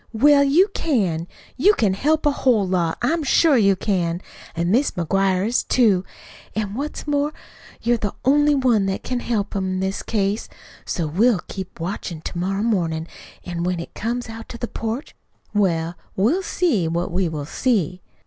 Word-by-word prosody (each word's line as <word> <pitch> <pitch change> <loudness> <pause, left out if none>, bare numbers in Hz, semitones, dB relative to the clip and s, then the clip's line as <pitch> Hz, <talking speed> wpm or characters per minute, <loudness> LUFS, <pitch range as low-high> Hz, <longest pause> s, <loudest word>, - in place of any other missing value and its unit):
"Well, 280 +5 +5
you 310 +8 +5
can. 185 - 0 0.3
You 405 +10 +5
can 205 -4 +2
help 305 +10 +1
a 295 - +5
whole 240 -8 +2
lot. 175 -3 0
I'm 325 +7 +2
sure 305 +1 +4
you 200 -5 +4
can. 175 -3 -1 0.4
An' 170 +2 0
Mis' 260 +7 +3
McGuire 190 +2 +1
is, 235 +3 +1
too. 210 -7 +3 0.5
An' 210 -2 -2
what's 285 +6 -4
more, 290 0 0 0.5
you're 240 +1 +3
the 205 -3 -3
only 290 +2 +4
one 240 -7 +2
what 190 - -2
can 250 -1 -2
help 215 -5 -2
'em, 190 -1 -1
in 185 - -2
this 190 +1 -2
case. 205 0 -1 0.4
So 170 - -2
we'll 195 +7 +2
keep 190 -2 -7
watch 180 +6 -4
to 160 - -7
morrow 195 +4 -1
mornin', 170 -8 0 0.4
an' 175 -1 -4
when 180 0 0
he 170 - -6
comes 240 +3 -3
out 225 0 -9
on 235 - -7
the 240 - -3
porch 225 +6 -5 0.4
well, 170 -5 +1 0.2
we'll 245 - +2
see 295 - +1
what 170 +2 -2
we 180 0 0
will 150 -3 -4
see." 185 - 0
205 Hz, 175 wpm, -22 LUFS, 180-250 Hz, 0.5 s, Well